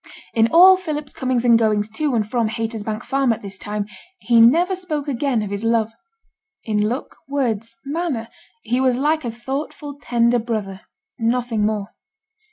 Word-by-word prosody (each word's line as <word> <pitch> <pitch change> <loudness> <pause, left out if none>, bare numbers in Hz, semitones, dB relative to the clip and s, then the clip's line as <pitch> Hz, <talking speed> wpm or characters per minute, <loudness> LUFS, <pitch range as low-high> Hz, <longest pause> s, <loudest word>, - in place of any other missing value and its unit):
In 225 -1 +4
all 370 +8 +7
Philip's 300 -5 -5
comings 255 -2 -1
and 235 -1 +6
goings 210 -2 +1
to 285 +3 -1
and 215 -2 0
from 230 -1 0
Haytersbank 225 0 -4
Farm 270 -2 +1
at 220 - -3
this 195 -1 -8
time, 210 0 -3 0.3
he 235 -8 +3
never 340 +11 +5
spoke 310 -6 -4
again 265 -4 0
of 205 - -5
his 200 +1 -3
love. 225 -1 +1 0.7
In 210 -1 0
look, 250 +4 -5
words, 230 -5 -2
manner, 285 -6 -2 0.4
he 250 +2 0
was 255 -2 +2
like 310 +3 +1
a 240 - -2
thoughtful, 280 +4 -6
tender 235 0 +2
brother; 215 -4 -4 0.4
nothing 230 -2 0
more. 210 -1 -3
235 Hz, 165 wpm, -21 LUFS, 220-275 Hz, 0.7 s, all